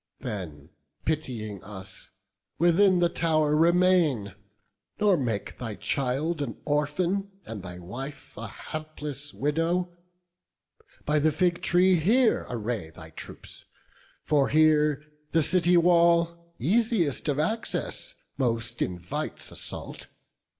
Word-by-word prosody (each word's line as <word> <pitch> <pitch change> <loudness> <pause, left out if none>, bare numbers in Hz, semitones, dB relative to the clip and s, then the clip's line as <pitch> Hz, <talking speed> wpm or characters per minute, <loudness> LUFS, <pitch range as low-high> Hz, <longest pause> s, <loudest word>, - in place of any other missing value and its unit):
Then 90 - -6 0.4
pitying 120 - -3
us, 95 -2 -10 0.5
within 180 +3 +5
the 175 - +5
tow'r 155 -3 +1
remain, 165 - +3 0.7
Nor 210 -2 +4
make 115 -9 -3
thy 115 -4 -4
child 140 +7 -1
an 125 -6 -4
orphan, 170 +7 0 0.2
and 110 -3 -6
thy 90 -1 -8
wife 130 +11 -8
A 115 +1 -6
hapless 150 +3 -6
widow; 170 +4 0 1.1
by 150 +1 +2
the 155 +2 +3
fig 175 +3 +1
tree 180 0 +4
here 225 +9 +3
Array 115 -7 -3
thy 80 - -12
troops; - - -9 0.6
for 145 -3 +2
here 150 -1 +4 0.3
the 165 -1 +4
city 180 +1 +4
wall, 170 0 +3
Easiest 185 - +1
of 145 -2 +1
access, 225 - -2 0.2
most 115 -2 -1
invites 90 -1 -4
assault. - - -6
150 Hz, 110 wpm, -27 LUFS, 120-175 Hz, 1.1 s, within